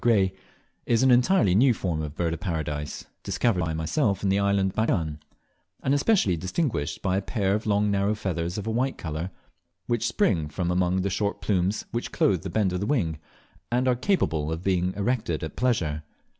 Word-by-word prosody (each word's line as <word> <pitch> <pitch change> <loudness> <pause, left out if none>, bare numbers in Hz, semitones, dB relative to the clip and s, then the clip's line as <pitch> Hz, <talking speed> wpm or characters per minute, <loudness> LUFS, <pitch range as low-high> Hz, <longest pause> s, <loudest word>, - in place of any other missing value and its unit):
Gray, 100 -6 +3 0.5
is 115 +1 +3
an 130 - +5
entirely 120 - +4
new 120 +4 +5
form 85 -6 -2
of 75 -1 -5
Bird 85 -2 0
of 85 - -5
Paradise, 75 -5 -3 0.2
discovered 115 -7 0
by 80 -1 -2
myself 100 - 0
in 100 - +2
the 100 +1 +3
island 100 -1 +2
of - - -25
Batchian, 80 -9 0 0.6
and 135 - +2
especially 145 - +3
distinguished 90 - -2
by 95 0 +1
a - - 0
pair 100 -1 0
of 105 +2 -2
long 105 0 +2
narrow 100 +1 +1
feathers 90 -3 -3
of 105 - -4
a 110 - -1
white 130 +4 0
colour, 80 +2 -4 0.6
which 120 -1 0
spring 95 - +1
from 90 +2 -2
among 90 +1 +1
the 100 - -1
short 100 +2 -1
plumes 95 0 0
which 120 - -3
clothe 95 -4 +2
the 95 - -5
bend 95 -1 +1
of 90 - -1
the 100 - -2
wing, 85 - 0 0.5
and 125 +2 +2
are 125 - +4
capable 80 - 0
of 80 +2 -4
being 90 -1 +1
erected 100 -7 -1
at 80 - -5
pleasure. 90 -12 0
95 Hz, 200 wpm, -26 LUFS, 85-115 Hz, 0.6 s, an